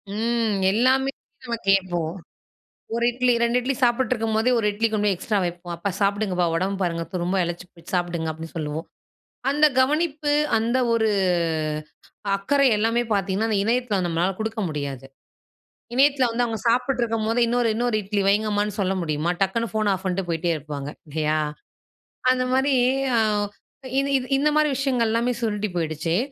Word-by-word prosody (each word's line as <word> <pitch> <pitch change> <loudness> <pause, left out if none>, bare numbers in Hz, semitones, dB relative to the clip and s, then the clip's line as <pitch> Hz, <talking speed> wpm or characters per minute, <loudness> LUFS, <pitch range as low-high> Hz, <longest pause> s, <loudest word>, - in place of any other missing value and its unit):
ம். 225 -2 0
எல்லாமே 260 +5 +3 0.3
நம்ம 235 -2 -2
கேப்போம். 175 -4 +1 0.8
1 235 - 0
இட்லி, 250 0 +2
2 235 +1 +3
இட்லி 265 +2 -1
சாப்பிட்டுருக்கும்போதே, 235 -2 +1
1 210 - 0
இட்லி 225 +2 +1
கொண்டு 210 -1 +1
போய் 195 - +3
எக்ஸ்ட்ரா 210 +3 -1
வைப்போம். 175 0 -5
"அப்பா 195 +4 -2
சாப்பிடுங்கப்பா. 200 -3 +1
உடம்ப 190 +3 -1
பாருங்க, 170 -1 -1
துரும்பா 180 +2 0
இளச்சு 175 +1 -5
போச் 170 - -13
சாப்டுங்க" 170 -2 -1
அப்படின்னு 160 +2 -9
சொல்வோம். 155 +1 -4 0.6
அந்த 300 +2 +5
கவனிப்பு, 300 +1 +1 0.3
அந்த 235 +3 +1
ஒரு 220 -1 +2 1.3
அக்கறை, 275 +7 +2
எல்லாமே 230 +3 +1
பாத்தீங்கன்னா, 200 +3 0
அந்த 210 - +2
இணையத்தில 230 -3 +1
நம்மளால 175 +3 0
கொடுக்க 220 0 -2
முடியாது. 140 -3 -5 0.9
இணையத்தில 270 -1 +4
வந்து, 240 +1 +1
அவுங்க 225 -2 -3
சாப்பிட்டுருக்கும்போதே, 235 -2 +1
இன்னொரு, 240 -1 +1
இன்னொரு 240 -1 +1
இட்லி 200 +1 -1
வைங்கம்மான்னு 210 0 +1
சொல்ல 190 0 +1
முடியுமா? 155 +1 -1
டக்குனு 230 +3 -1
ஃபோன் 215 -1 +1
ஆஃப் 190 - -5
பண்ணிட்டு, 185 0 -1
போயிட்டே 170 +1 0
இருப்பாங்க. 145 -1 -6 0.2
இல்லையா? 155 +1 0 0.9
அந்த 255 0 0
மாதிரி, 265 +1 +2 0.4
அ, - - +4 0.8
இது 275 - -1
இது, 255 - -6
இந்த 300 +2 +3
மாதிரி, 305 -1 +4
விஷயங்கள் 255 -4 +1
எல்லாமே 235 +2 +1
சுருண்டு 210 -2 -1
போயிடுச்சு. 165 +1 -1
215 Hz, 150 wpm, -23 LUFS, 175-240 Hz, 1.3 s, அந்த